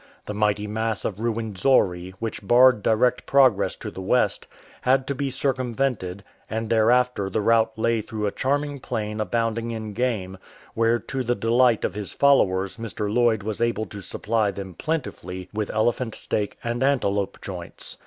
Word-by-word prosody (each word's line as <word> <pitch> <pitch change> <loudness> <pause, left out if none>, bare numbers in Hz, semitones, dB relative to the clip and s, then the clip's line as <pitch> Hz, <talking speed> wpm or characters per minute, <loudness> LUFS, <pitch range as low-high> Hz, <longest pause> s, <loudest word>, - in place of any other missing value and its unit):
The 105 - -4
mighty 105 0 +1
mass 110 0 -2
of 100 -1 -3
Ruwenzori, 105 -5 +1
which 115 0 -4
barred 120 +2 +5
direct 115 +4 +2
progress 130 -7 +4
to - - -7
the 95 - -8
west, 105 +1 +1 0.3
had 130 +1 +3
to 140 - -2
be 140 +1 -2
circumvented, 125 -8 -1 0.3
and 110 +1 -3
there 110 0 +4
after 125 -5 +2
the 105 - -1
route 110 +1 +2
lay 115 0 +1
through 105 0 -4
a 100 - 0
charming 145 +3 -1
plain 110 -4 -3
abounding 115 +1 -1
in 110 -2 -5
game, 100 -6 -2 0.3
where 115 +1 +2
to 130 +2 -4
the 120 0 0
delight 115 +2 +3
of - - -2
his 105 -1 -6
followers 95 -10 +3
Mr. 105 -2 -4
Lloyd 115 -4 +3
was 110 +1 -3
able 115 -2 +1
to 100 0 -9
supply 110 +2 0
them 95 -1 -6
plentifully 95 - -4
with 105 -1 -2
elephant 115 +1 0
steak 105 -1 -3
and 120 +1 -2
antelope 105 -8 +1
joints. 90 -4 -7
110 Hz, 165 wpm, -24 LUFS, 105-125 Hz, 0.3 s, barred